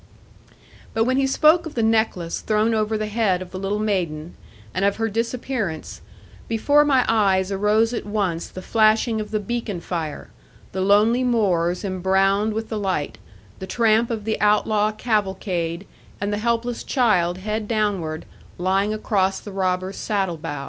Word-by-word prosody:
But 225 - +3
when 255 +3 +1
he 270 0 +2
spoke 315 +5 +4
of 310 - -10
the 230 - +1
necklace 220 -7 0
thrown 215 +1 +1
over 215 0 0
the 215 - -2
head 210 -4 +1
of 180 -1 -9
the 185 - -6
little 195 +2 -1
maiden, 175 -7 -2 0.4
and 190 - -1
of 200 0 +2
her 225 0 -1
disappearance, 230 -5 -3 0.5
before 285 +6 +3
my 270 -4 +3
eyes 195 -3 +2
arose 210 +4 +2
at - - -3
once 200 -5 -2
the 185 - -9
flashing 220 +1 +2
of 210 - -6
the 215 - -1
beacon 210 -2 -3
fire, 165 -3 -5 0.4
the 190 - -3
lonely 210 +6 +4
moors 185 -8 +1
embrowned 195 +3 +1
with 225 0 -3
the 220 - -3
light, 185 -7 -2 0.4
the 190 - -6
tramp 225 +2 +2
of 225 -3 -3
the 220 - -2
outlaw 210 0 +3
cavalcade, 195 -5 -2 0.3
and 205 +1 -2
the 205 - -1
helpless 235 +1 -1
child 185 -9 +2
head 210 +2 -3
downward, 200 -8 -1 0.3
lying 195 +4 +1
across 195 -3 0
the 205 - -9
robber's 185 0 -1
saddle 195 -5 -1
bow. 150 -3 -5
210 Hz, 160 wpm, -22 LUFS, 190-225 Hz, 0.5 s, spoke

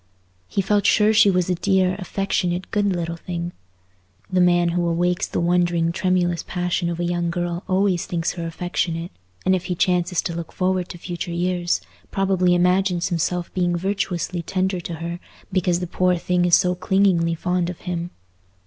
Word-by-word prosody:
He 195 - -1
felt 205 +1 +2
sure 215 0 +4
she 210 -2 +6
was 180 -2 +2
a 185 - +1
dear, 185 0 +2
affectionate, 185 -2 -2
good 205 -1 +1
little 170 -3 -2
thing. 170 0 -4 0.8
The 185 - +4
man 175 -1 +4
who 175 0 0
awakes 175 +1 +1
the - - -2
wondering 175 -1 +2
tremulous 180 -1 +1
passion 175 -1 -1
of 170 0 -4
a - - 0
young 175 0 0
girl 175 +1 -2
always 185 -2 +1
thinks 170 -1 -1
her 170 -2 -5
affectionate; 170 0 -2 0.3
and 190 - +4
if 180 - -3
he 180 - -2
chances 180 -1 +1
to 170 - -3
look 165 -1 -6
forward 185 -1 0
to - - -7
future 175 0 -5
years, 175 0 0 0.3
probably 190 -2 +2
imagines 180 0 +2
himself 175 0 -1
being 175 -1 +1
virtuously 180 -1 -2
tender 185 +2 -1
to 170 0 -5
her, 170 +2 -5 0.3
because 180 -1 +1
the - - -1
poor 180 +1 +1
thing 180 +1 +1
is 175 -2 +6
so 180 0 +2
clingingly 180 -3 +2
fond 180 +1 -1
of 180 - -8
him. 175 -1 -3
180 Hz, 175 wpm, -22 LUFS, 170-185 Hz, 0.8 s, she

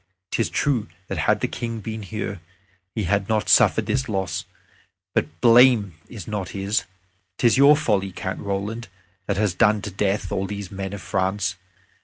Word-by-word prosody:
'Tis 115 - 0
true 130 -7 0 0.2
that - - -3
had - - +2
the - - +1
King 115 -1 -4
been 110 +1 -5
here, 100 -2 -5 0.5
we 110 - -1
had 100 +2 0
not 110 -1 +1
suffered - - +5
this 130 -2 -1
loss. 95 -3 -2 0.7
But - - +2
the - - -28
blame 115 -5 +6 0.2
is 105 -8 -9
not 100 -4 -3
his. 100 0 0 0.5
'Tis 120 -2 +4
your 140 +2 +7
folly, 100 -9 0
Count 95 +1 -5
Roland, 100 +4 -3 0.4
that 100 - 0
has 105 -3 +1
done 105 +3 +3
to 105 - -5
death 100 +1 -1
all 95 0 -1
these 100 -2 -6
men 95 0 -5
of 100 -1 -7
France. 95 -1 0
105 Hz, 175 wpm, -23 LUFS, 95-115 Hz, 0.7 s, your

